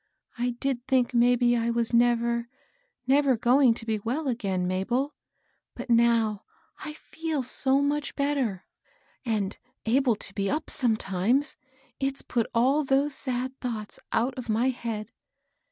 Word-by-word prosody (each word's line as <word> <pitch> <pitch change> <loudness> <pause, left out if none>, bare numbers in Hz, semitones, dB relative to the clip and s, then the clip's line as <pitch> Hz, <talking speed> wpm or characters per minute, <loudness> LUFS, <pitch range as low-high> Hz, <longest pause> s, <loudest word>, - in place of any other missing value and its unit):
I 245 0 -2
did 260 -3 -2
think 260 -2 +2
maybe 240 0 +4
I 230 0 0
was 235 0 0
never, 235 0 +2 0.6
never 270 -1 +3
going 250 +1 +4
to 225 - -5
be 220 -2 -1
well 260 +9 -3
again, 195 -7 -1
Mabel; 235 +10 -1 0.6
but - - -5
now 230 -3 +3 0.4
I 305 - -6
feel 315 -2 -4
so 270 +2 +1
much 290 0 -1
better, 275 -9 -1 0.6
and 210 -4 -1 0.3
able 245 +1 +3
to 195 - -4
be 200 -1 -1
up 305 - -2
sometimes, 225 +3 +1 0.4
it's 270 0 -1
put 235 -2 -1
all 265 +6 +3
those 275 +1 +2
sad 255 0 -1
thoughts 220 -4 -5
out 245 +4 +1
of 240 -2 -8
my 230 +4 +2
head. 230 -3 -5
240 Hz, 140 wpm, -27 LUFS, 225-270 Hz, 0.6 s, maybe